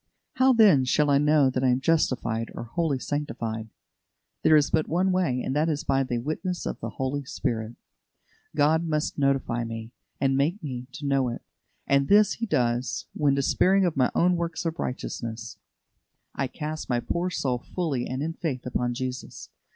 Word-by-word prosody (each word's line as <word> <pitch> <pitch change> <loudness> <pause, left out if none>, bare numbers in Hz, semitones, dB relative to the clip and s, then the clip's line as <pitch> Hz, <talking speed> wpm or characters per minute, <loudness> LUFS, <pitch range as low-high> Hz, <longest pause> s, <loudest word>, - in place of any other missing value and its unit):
How, 260 +1 +5
then, 210 - +6
shall 145 +3 +2
I 140 - +5
know 150 -2 +4
that 130 0 -1
I - - +4
am 125 +1 +2
justified 125 -7 0
or - - -5
wholly 145 +4 -1
sanctified? 115 -6 -4 0.7
There 155 - +5
is 150 -1 +3
but 155 - +2
one 185 +4 +1
way, 170 -9 +1
and 130 - -2
that 155 +2 +2
is 150 -1 -1
by 135 0 +2
the 125 -2 -1
witness 155 +8 -3
of - - -4
the - - -4
Holy 140 +1 -2
Spirit. 115 -4 -3 0.8
God 155 +2 +3
must 155 -2 -1
notify 135 -4 +1
me, 115 0 -6 0.3
and 135 -1 +2
make 160 +8 0
me 125 -4 -5
to 145 - -7
know 135 -2 +2
it; 120 - -6 0.4
and 140 0 +2
this 210 +1 +5
He 230 - -4
does, 120 - 0
when, 140 -2 +2
despairing 185 +8 +3
of 175 - 0
my 130 -2 +3
own 180 +1 +3
works 170 +1 -3
of 165 0 -2
righteousness, 115 -3 -5 0.7
I 135 - -1
cast 155 +3 -5
my 120 -1 +2
poor 175 +8 -2
soul 130 -7 -1
fully 145 -5 -3
and 130 +2 -3
in 165 +1 -2
faith 150 -7 -4
upon 120 -1 -1
Jesus. 130 0 -5
140 Hz, 180 wpm, -26 LUFS, 125-160 Hz, 0.8 s, then